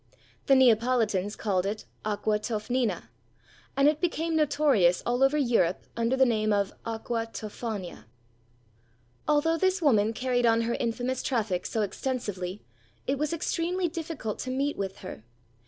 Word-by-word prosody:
The 275 - +6
Neapolitans 225 -5 +3
called 190 -4 0
it 205 +3 -3 0.2
Aqua 210 0 0
Toffnina; 220 -1 -2 0.7
and 275 +1 +5
it 300 0 +2
became 330 -2 0
notorious 285 - +3
all 245 +2 0
over 270 +3 +4
Europe 230 - +2
under 235 +3 +1
the 265 - +6
name 215 -3 +1
of 200 -1 +1
Aqua 230 0 -2
Tophania. 215 -4 -6 1.2
Although 305 +2 +3
this 375 +1 +2
woman 225 -8 +3
carried 245 0 +1
on 230 0 +4
her 230 +1 -1
infamous 245 +2 -2
traffic 215 -9 -1
so 220 - -1
extensively, 205 -4 -4 0.4
it 270 +1 -1
was 300 0 0
extremely 345 +2 -1
difficult 320 - -5
to 255 - -4
meet 275 +3 0
with 195 -1 -4
her. 110 -12 -8
235 Hz, 140 wpm, -28 LUFS, 210-280 Hz, 1.2 s, The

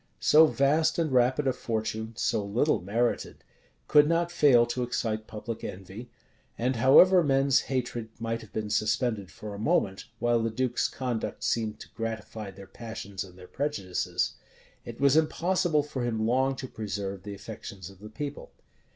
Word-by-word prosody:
So 160 +1 +6
vast 150 +3 +2
and 165 -4 0
rapid 130 +3 +3
a 130 - +2
fortune, 110 -1 -3
so 110 -3 0
little 115 - +1
merited, 115 +6 -1 0.4
could 150 0 +6
not 170 +1 +1
fail 130 -8 +5
to 120 +1 -3
excite 110 -3 -2
public 110 +1 -6
envy; 95 +6 -8 0.5
and 125 +1 0
however 175 +10 +7
men's 135 -2 +3
hatred 125 -4 -2
might 115 0 -2
have 110 - -14
been 105 -1 -4
suspended 110 -3 0
for 105 -1 -8
a 100 - -7
moment, 95 -3 0
while 120 0 +2
the 115 - 0
duke's 125 +2 0
conduct 125 -4 -4
seemed 110 -2 -1
to - - -11
gratify 110 -2 -5
their 100 +1 -11
passions 100 -2 -7
and 90 -1 -14
their 90 0 -12
prejudices, 115 -11 -2 0.5
it 120 -1 -8
was 140 0 +4
impossible 160 0 +2
for 140 -4 -4
him 110 -2 -1
long 130 +3 +2
to 130 0 -6
preserve 100 -4 -5
the 100 +1 -7
affections 95 -1 -9
of 95 - -18
the 105 +1 -10
people. 145 +5 -6
115 Hz, 165 wpm, -28 LUFS, 105-135 Hz, 0.5 s, however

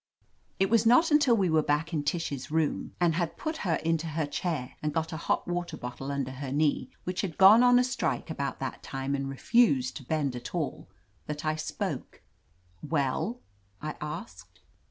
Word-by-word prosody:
It 195 +2 +2
was 230 -2 +5
not 315 +8 +5
until 285 -6 +5
we 195 -3 +2
were 160 -1 +4
back 150 +3 0
in 155 - +1
Tish's 145 -3 -2
room, 160 -1 -1
and 175 -2 +3
had 170 0 -2
put 315 0 -3
her 175 - 0
into 165 0 +1
her 155 0 -1
chair 145 -3 -3
and 150 -1 -2
got 160 0 -1
a - - -3
hot - - +1
water 175 0 -3
bottle 125 +3 -6
under 140 -2 -2
her 130 0 -6
knee, 145 -3 +1
which 180 0 -2
had 175 -5 -4
gone 200 +5 +8
on 245 0 +6
a 250 - +5
strike 165 - -2
about 140 -3 -3
that 135 - -4
time 135 0 -3
and 135 -1 -2
refused 135 - +2
to - - -10
bend 140 -1 -1
at 120 - -7
all, - - -3 0.4
that 150 +1 -5
I 155 0 +1
spoke. 155 - -4 0.6
"Well?" 160 - -1 0.4
I 155 +1 -5
asked. 90 - -8
155 Hz, 190 wpm, -29 LUFS, 140-180 Hz, 0.6 s, gone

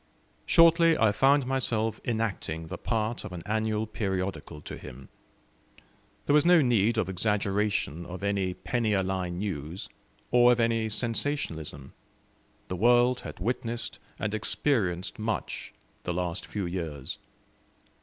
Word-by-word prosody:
Shortly 165 -1 +6
I 110 -1 +4
found 135 +5 +4
myself 115 -4 0
enacting 100 -8 -2
the - - -5
part 115 0 -1
of - - -7
an 85 -2 -6
annual 110 0 0
periodical 95 -7 -3
to - - -7
him. 65 +1 -11 1.2
There - - +2
was 150 -1 +6
no 175 -3 +6
need 115 -2 +3
of 110 - +1
exaggeration 100 -4 0
of 90 +2 -7
any 100 -2 0
penny 115 -3 -1
a 95 -1 +2
line 90 -2 -2
news, 90 -3 -4 0.4
or 120 0 +6
of 120 - -2
any 115 -1 +2
sensationalism. 110 - -3 0.7
The 90 - -4
world 120 +4 +4
had - - -9
witnessed 115 +3 -2 0.2
and 105 0 -2
experienced 105 -6 0
much 110 0 -3 0.3
the 90 - -3
last 90 0 -2
few 100 -3 -3
years. 80 -6 -4
105 Hz, 135 wpm, -28 LUFS, 90-120 Hz, 1.2 s, Shortly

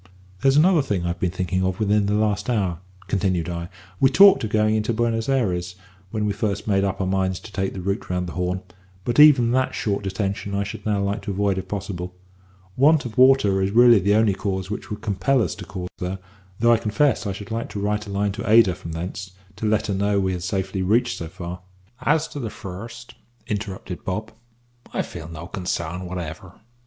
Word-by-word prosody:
"There's 135 +1 +4
another 170 +1 +5
thing 100 -10 -2
I've 85 0 -2
been 90 - +1
thinking 95 +1 -1
of 95 -1 -1
within 105 -1 +2
the 105 - +1
last 105 +1 0
hour," 95 -8 0 0.3
continued 95 -3 0
I. 85 0 -4 0.3
"We 135 - +5
talked 195 +4 +7
of 110 - -2
going 110 0 +2
into 110 +1 0
Buenos 115 +1 0
Ayres 90 -9 0 0.3
when 105 0 -2
we 105 - 0
first 100 -1 -2
made 100 -2 +2
up 100 -1 -1
our 95 - 0
minds 95 -1 0
to 105 - -11
take 95 -1 -2
the 95 - -5
route 100 +2 -3
round 90 0 -1
the 85 - -6
Horn; 90 +1 -2 0.4
but 120 +3 0
even 135 -6 +7
that 130 +1 +1
short 100 -1 -1
detention 100 0 -3
I 100 - 0
should 100 +2 -7
now 105 -2 +1
like 100 +2 -1
to - - -7
avoid 100 -1 0
if 95 - -7
possible. 90 -2 -5 0.6
Want 150 +3 +4
of 115 - -6
water 130 -7 +5
is 95 - +1
really 120 +1 +6
the 100 +2 +2
only 110 -2 +4
cause 95 0 -3
which 105 - -5
would 105 0 -5
compel 105 +6 +1
us 105 -8 0
to - - -9
call 90 -1 -6
there, 90 +1 -3 0.4
though 120 +1 +5
I - - +4
confess 120 +3 +1
I - - -1
should 100 +1 -8
like 115 +1 -3
to 105 - -5
write 105 +1 -1
a - - -6
line 100 +1 0
to 105 +2 -5
Ada 110 -4 +6
from 85 -1 -8
thence, 90 +3 -6 0.2
to 110 - -2
let 105 0 +1
her 100 - -1
know 100 +1 +1
we 95 -1 0
had 90 - -4
safely 95 +1 -2
reached 115 +6 +1
so 85 - -5
far 90 +1 -7 0.3
" 120 +6 -33
"As 160 0 -1
to 145 - -7
the 115 -5 -3
first," 115 +5 -9 0.3
interrupted 100 -4 -5
Bob, 105 +4 -3 0.6
"I - - -1
feel 80 - -8
no 85 0 -8
consarn 90 -1 -4
whatever. 90 +1 -7
100 Hz, 220 wpm, -23 LUFS, 95-110 Hz, 0.6 s, talked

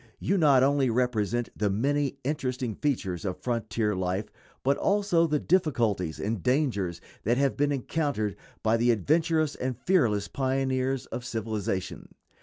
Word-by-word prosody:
You 195 - 0
not 145 -8 +5
only 140 -1 +3
represent 120 -1 0
the 105 -1 0
many 140 +6 0
interesting 130 -4 -2
features 105 - -2
of 95 -3 -3
frontier 115 -3 -1
life, 95 +3 -2 0.3
but 140 +2 +3
also 195 -5 +2
the 150 -1 +1
difficulties 120 - +1
and 105 -1 -2
dangers 105 - 0 0.2
that 120 +3 +2
have 140 -1 +2
been 145 0 +1
encountered 135 - -1 0.3
by 110 +1 +3
the 120 +1 +2
adventurous 155 - +2
and 130 -2 -3
fearless 115 - +2
pioneers 130 +1 -1
of 125 - -6
civilization. 110 -5 -4
125 Hz, 140 wpm, -27 LUFS, 105-145 Hz, 0.3 s, not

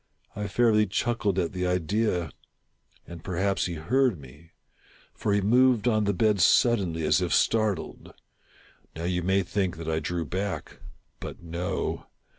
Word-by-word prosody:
I 105 -1 -3
fairly 105 0 +3
chuckled 105 -1 -1
at 90 -1 -1
the 90 -1 -2
idea; 90 -1 0 0.7
and 85 -2 -10
perhaps 95 +2 -1
he 85 - -5
heard 115 - +1
me; 75 +5 -15 0.6
for 105 - -2
he 100 0 +2
moved 120 +2 +3
on 110 -3 +2
the 100 - +2
bed 105 +1 +2
suddenly, 95 -5 +3
as - - +3
if - - -1
startled. 110 -6 0 0.8
Now 80 - -6
you 90 0 -1
may 95 +2 +1
think 95 -2 -2
that 80 -1 -7
I 80 0 0
drew 85 +2 -3
back 95 +6 -4 0.2
— - - -44
but - - -8
no. 85 +2 -3
95 Hz, 155 wpm, -26 LUFS, 85-105 Hz, 0.8 s, fairly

